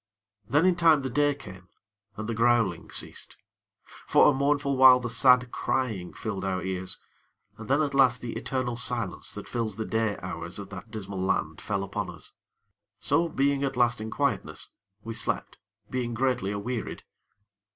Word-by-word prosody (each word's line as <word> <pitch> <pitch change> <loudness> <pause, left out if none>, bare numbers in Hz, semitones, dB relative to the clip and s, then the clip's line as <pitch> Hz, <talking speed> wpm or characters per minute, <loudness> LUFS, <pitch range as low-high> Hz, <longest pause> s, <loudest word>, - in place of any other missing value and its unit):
Then 150 - +3
in 185 -1 +4
time 165 -5 +4
the 130 - -3
day 145 +2 +2
came, 95 -9 -12 0.5
and 110 0 -4
the 115 - -1
growling 115 -6 +2
ceased. - - -4 0.7
For - - +6
a - - -1
mournful 140 0 +1
while 130 -1 +8
the 120 -2 -4
sad 125 0 +5
crying 110 -9 -2
filled 100 -3 -5
our 95 -2 -1
ears, 95 0 -2 0.6
and 110 +1 -10
then 145 +3 +3
at 145 - -2
last 130 -4 +4
the 115 0 -5
eternal 130 -2 -2
silence 120 -5 -3
that - - -7
fills 115 -4 -2
the 110 +1 -3
day 110 -2 0
hours - - -5
of - - -7
that 115 - -9
dismal 100 -4 -5
land 95 - -1
fell 100 -1 -2
upon 100 - -4
us. - - -10 0.7
So, 170 0 +2
being 140 -1 +1
at 135 -2 -2
last 120 -2 +2
in 110 - -4
quietness, 140 -2 -2 0.3
we 115 - -5
slept, - - -3 0.3
being 120 -2 -2
greatly 125 -5 0
awearied. 110 +4 -4
120 Hz, 170 wpm, -27 LUFS, 105-135 Hz, 0.7 s, while